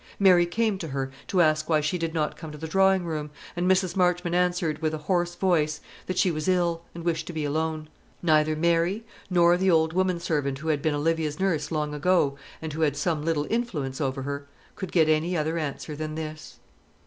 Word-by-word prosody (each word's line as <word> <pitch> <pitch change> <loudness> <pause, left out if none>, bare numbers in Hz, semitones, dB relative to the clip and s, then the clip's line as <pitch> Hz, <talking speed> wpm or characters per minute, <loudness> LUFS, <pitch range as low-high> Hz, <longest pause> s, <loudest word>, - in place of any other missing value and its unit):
Mary 180 -3 +5
came 210 +2 0
to 165 - -4
her 135 -1 -3 0.2
to 185 - +2
ask 155 -1 +2
why 155 -2 +4
she 150 +4 -1
did 165 -1 -1
not 155 -2 -1
come 160 -2 -8
to 150 - -9
the 160 +2 -6
drawing 190 +1 +3
room, 155 -2 -3 0.3
and 175 +1 0
Mrs. 185 -2 +2
Marchmont 180 -1 +1
answered, 175 -3 +1
with 155 -1 0
a 150 -1 -10
hoarse 175 -1 0
voice, 155 -5 +1 0.3
that 185 - -3
she 185 - +3
was 155 0 -3
ill, 175 -2 +1
and 170 - -7
wished 165 -1 -1
to 175 - -6
be 155 -2 -2
alone. 155 +1 -2 0.4
Neither 155 -1 +3
Mary, 170 +6 +1 0.2
nor 175 -1 +5
the 190 +1 +2
old 160 -2 +3
woman 185 -1 +1
servant 145 -6 -1
who 155 +3 -4
had 150 -2 +1
been 155 -1 +1
Olivia's 155 0 0
nurse 160 -7 0
long 150 -2 -1
ago, 150 -2 +2 0.3
and 160 -2 -4
who 160 - -4
had 145 -2 +2
some 150 0 0
little 155 -2 0
influence 155 - -2
over 135 -1 -1
her, 140 +1 -5 0.3
could 190 - -6
get 160 -3 +4
any 160 +3 +2
other 160 +2 -1
answer 150 0 -4
than 155 0 -4
this. 155 -1 -7
160 Hz, 215 wpm, -26 LUFS, 150-175 Hz, 0.4 s, Mary